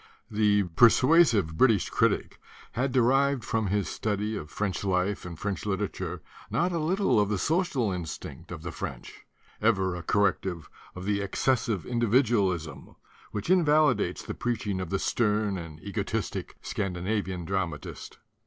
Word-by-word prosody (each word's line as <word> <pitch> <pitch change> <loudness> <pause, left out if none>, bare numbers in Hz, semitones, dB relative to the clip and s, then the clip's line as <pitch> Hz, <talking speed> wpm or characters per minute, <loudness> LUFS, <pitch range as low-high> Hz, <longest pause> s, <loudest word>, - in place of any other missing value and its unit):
The 105 -1 +3
persuasive 120 - +5
British 110 -5 +3
critic - - +1 0.3
had 130 +2 -1
de 125 -1 +3
rived 135 0 +2
from 110 -3 0
his 100 0 0
study 105 0 -2
of 75 -6 -6
French 100 0 -2
life 95 0 0
and 85 -2 -8
French 100 +1 -3
literature 100 0 -3 0.3
not 175 +2 +1
a 170 - -1
little 180 - +2
of 100 -1 +2
the 105 - 0
social 150 - +1
instinct 85 -4 -6
of - - -7
the - - -4
French, - - -8 0.3
ever 95 -5 +2
a 90 - -5
corrective 95 -2 0 0.2
of 90 0 -7
the 100 0 0
excessive 110 0 0
in 120 -1 -2
dividualism 100 - +1 0.3
which 105 - -3
invalidates 155 -4 +3
the - - -5
preaching 105 -5 -2
of 90 - -5
the 95 - 0
stern 105 -2 +1
and 80 -2 -9
egotistic 100 -3 -3
Scandinavian 95 -1 -2
dramatist. 85 -5 -4
105 Hz, 145 wpm, -28 LUFS, 95-120 Hz, 0.3 s, persuasive